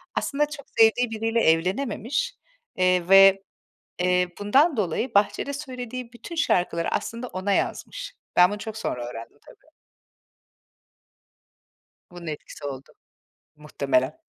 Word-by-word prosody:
Aslında 295 Hz, +1 st, 0 dB
çok 285 Hz, -2 st, -9 dB
sevdiği 225 Hz, +2 st, +5 dB
biriyle 225 Hz, +1 st, 0 dB
evlenememiş, 230 Hz, -, 0 dB, 0.4 s
eee, 185 Hz, -1 st, +2 dB
ve, 195 Hz, 0 st, +7 dB, 0.6 s
eee, 180 Hz, 0 st, +2 dB
bundan 270 Hz, +8 st, +3 dB
dolayı 205 Hz, +6 st, -1 dB
bahçede 210 Hz, +7 st, +1 dB
söylediği 255 Hz, -3 st, -7 dB
bütün 240 Hz, +8 st, -9 dB
şarkıları 175 Hz, -, +1 dB
aslında 235 Hz, +2 st, -3 dB
ona 185 Hz, +1 st, -3 dB
yazmış. -, -, -3 dB, 0.2 s
Ben 180 Hz, +1 st, +7 dB
bunu 205 Hz, -, -3 dB
çok 220 Hz, 0 st, -6 dB
sonra 125 Hz, -, -3 dB
öğrendim 115 Hz, -1 st, -10 dB
tabii. -, -, -20 dB, 2.4 s
Bunun 175 Hz, -2 st, -10 dB
etkisi 150 Hz, 0 st, -8 dB
oldu 135 Hz, -1 st, -7 dB, 0.7 s
muhtemelen. 140 Hz, -2 st, -1 dB
205 Hz, 115 wpm, -25 LUFS, 175-250 Hz, 2.4 s, ve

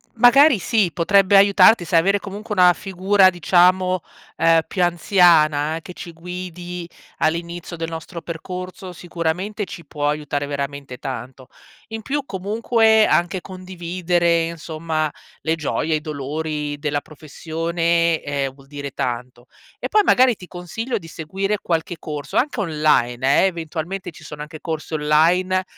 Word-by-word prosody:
Magari 245 Hz, +1 st, +6 dB
sì, 210 Hz, -4 st, +1 dB
potrebbe 195 Hz, +4 st, +3 dB
aiutarti, 200 Hz, 0 st, +6 dB
sai, 170 Hz, -, +2 dB
avere 195 Hz, +4 st, +2 dB
comunque 210 Hz, +2 st, -7 dB
una 180 Hz, -1 st, +6 dB
figura 190 Hz, +1 st, +3 dB
diciamo, 180 Hz, +1 st, +3 dB, 0.4 s
ehm, 165 Hz, 0 st, +4 dB
più 185 Hz, -, -1 dB
anziana, 165 Hz, -4 st, +3 dB
che 180 Hz, -, -10 dB
ci 175 Hz, -1 st, -9 dB
guidi 180 Hz, 0 st, -7 dB, 0.3 s
all'inizio 170 Hz, +2 st, -2 dB
del 165 Hz, -1 st, -4 dB
nostro 165 Hz, +1 st, -7 dB
percorso, 180 Hz, +3 st, -7 dB
sicuramente 175 Hz, +5 st, -3 dB
ci 170 Hz, -, -10 dB
può 145 Hz, 0 st, -2 dB
aiutare 145 Hz, -1 st, -2 dB
veramente 140 Hz, -2 st, -5 dB
tanto. 130 Hz, +2 st, -7 dB, 0.4 s
In 225 Hz, -1 st, -7 dB
più 285 Hz, +3 st, -2 dB
comunque, 220 Hz, +3 st, +2 dB
anche 175 Hz, +2 st, +1 dB
condividere 175 Hz, -2 st, -1 dB
insomma, 160 Hz, -2 st, -3 dB, 0.3 s
le 160 Hz, 0 st, 0 dB
gioie, 160 Hz, 0 st, -1 dB
i 155 Hz, -, -2 dB
dolori 150 Hz, 0 st, -4 dB
della 145 Hz, 0 st, -2 dB
professione 165 Hz, +2 st, -1 dB
eh 140 Hz, -1 st, -2 dB
vuol 135 Hz, 0 st, -19 dB
dire 140 Hz, 0 st, -7 dB
tanto. 125 Hz, 0 st, -5 dB, 0.3 s
E -, -, -3 dB
poi, 425 Hz, -1 st, +4 dB
magari 250 Hz, -2 st, +5 dB
ti 185 Hz, -, -12 dB
consiglio 180 Hz, +8 st, -5 dB
di 165 Hz, -, -12 dB
seguire 190 Hz, +6 st, -3 dB
qualche 165 Hz, +1 st, -2 dB
corso 150 Hz, -2 st, -5 dB
anche 270 Hz, -3 st, 0 dB
online 140 Hz, -6 st, +2 dB
eh, -, -, +4 dB
eventualmente 170 Hz, +2 st, -5 dB
ci -, -, -15 dB
sono 150 Hz, 0 st, -8 dB
anche 155 Hz, +1 st, -11 dB
corsi 160 Hz, -1 st, -5 dB
online, 170 Hz, +5 st, +2 dB
170 Hz, 140 wpm, -21 LUFS, 155-185 Hz, 0.4 s, Magari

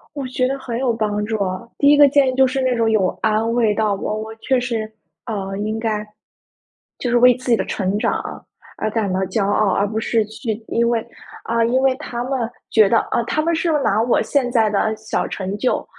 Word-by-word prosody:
我 280 Hz, -2 st, -4 dB
觉 255 Hz, 0 st, 0 dB
得 275 Hz, +1 st, -2 dB
很 240 Hz, -3 st, -5 dB
有 250 Hz, -3 st, +1 dB
帮 210 Hz, -2 st, -1 dB
助 220 Hz, +1 st, -2 dB
啊。 185 Hz, 0 st, -3 dB, 0.2 s
第 285 Hz, -, +4 dB
一 295 Hz, -, +6 dB
个 290 Hz, -1 st, +8 dB
建 280 Hz, 0 st, +3 dB
议 -, -, -2 dB
就 265 Hz, 0 st, +5 dB
是 265 Hz, +1 st, -2 dB
那 255 Hz, -1 st, +1 dB
种 230 Hz, -1 st, +1 dB
有 210 Hz, -4 st, +2 dB
安 220 Hz, +1 st, +1 dB
慰 225 Hz, -3 st, +2 dB
到 215 Hz, -1 st, +1 dB
我。 215 Hz, +2 st, -3 dB
我 220 Hz, 0 st, -7 dB
确 260 Hz, +3 st, 0 dB
实， 230 Hz, -3 st, -3 dB, 0.4 s
呃， 195 Hz, -3 st, -4 dB
应 215 Hz, +2 st, -2 dB
该 215 Hz, -2 st, -2 dB, 0.9 s
就 245 Hz, -, -3 dB
是 240 Hz, -, +3 dB
为 250 Hz, 0 st, +6 dB
自 255 Hz, -1 st, -4 dB
己 230 Hz, -, +5 dB
的 -, -, -2 dB
成 195 Hz, +1 st, -1 dB
长， -, -, 0 dB, 0.6 s
而 215 Hz, -, -1 dB
感 215 Hz, -3 st, -1 dB
到 185 Hz, -, 0 dB
骄 200 Hz, +1 st, -1 dB
傲， 205 Hz, 0 st, +2 dB
而 200 Hz, -, +1 dB
不 220 Hz, +2 st, -2 dB
是 225 Hz, 0 st, +1 dB
去 220 Hz, +1 st, -4 dB, 0.2 s
因 235 Hz, 0 st, +1 dB
为 230 Hz, -2 st, 0 dB, 0.4 s
啊， 230 Hz, 0 st, 0 dB
因 255 Hz, +3 st, +1 dB
为 265 Hz, -1 st, +3 dB
他 245 Hz, -4 st, -5 dB
们 265 Hz, +1 st, -2 dB, 0.3 s
觉 215 Hz, -3 st, +5 dB
得， 230 Hz, -, +4 dB
啊 -, -, +2 dB
他 310 Hz, +6 st, -1 dB
们 335 Hz, +2 st, 0 dB
是 330 Hz, +1 st, 0 dB
拿 210 Hz, +2 st, +2 dB
我 235 Hz, +1 st, +2 dB
现 265 Hz, -4 st, 0 dB
在 225 Hz, -3 st, +2 dB
的 220 Hz, +1 st, 0 dB
小 220 Hz, 0 st, -3 dB
成 190 Hz, 0 st, -4 dB
就 250 Hz, -, 0 dB
225 Hz, 250 characters per minute, -20 LUFS, 215-255 Hz, 0.9 s, 个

